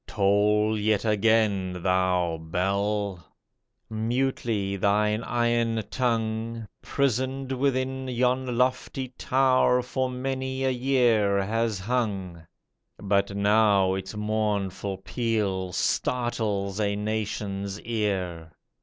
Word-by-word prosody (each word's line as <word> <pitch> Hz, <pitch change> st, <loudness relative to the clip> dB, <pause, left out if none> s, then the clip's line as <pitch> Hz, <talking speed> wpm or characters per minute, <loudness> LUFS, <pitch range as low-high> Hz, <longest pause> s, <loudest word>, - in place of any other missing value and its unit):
Toll 105 Hz, +2 st, +2 dB
yet 105 Hz, 0 st, +1 dB
again, 105 Hz, -4 st, +2 dB
thou 90 Hz, -2 st, +1 dB
bell! 100 Hz, +2 st, -1 dB, 0.6 s
Mutely 110 Hz, -3 st, -1 dB
thine 105 Hz, +2 st, +1 dB
iron 120 Hz, -2 st, 0 dB
tongue. 115 Hz, -2 st, -1 dB
Prisoned 135 Hz, 0 st, -1 dB
within 130 Hz, 0 st, -1 dB
yon 125 Hz, 0 st, 0 dB
lofty 130 Hz, +1 st, 0 dB
tower, 130 Hz, 0 st, +2 dB
For 130 Hz, +1 st, -2 dB
many 130 Hz, +1 st, -3 dB
a 130 Hz, -, +2 dB
year 120 Hz, -6 st, +2 dB
has 115 Hz, +1 st, 0 dB
hung. 100 Hz, -5 st, -2 dB, 0.6 s
But 100 Hz, 0 st, 0 dB
now 100 Hz, -2 st, +4 dB
its 95 Hz, +2 st, -5 dB
mournful 105 Hz, -2 st, -1 dB
peal 105 Hz, -6 st, -1 dB
Startles 105 Hz, -1 st, -1 dB
a 100 Hz, -1 st, +1 dB
nation's 105 Hz, -2 st, -3 dB
ear. 95 Hz, -8 st, -2 dB
110 Hz, 90 wpm, -26 LUFS, 100-125 Hz, 0.6 s, now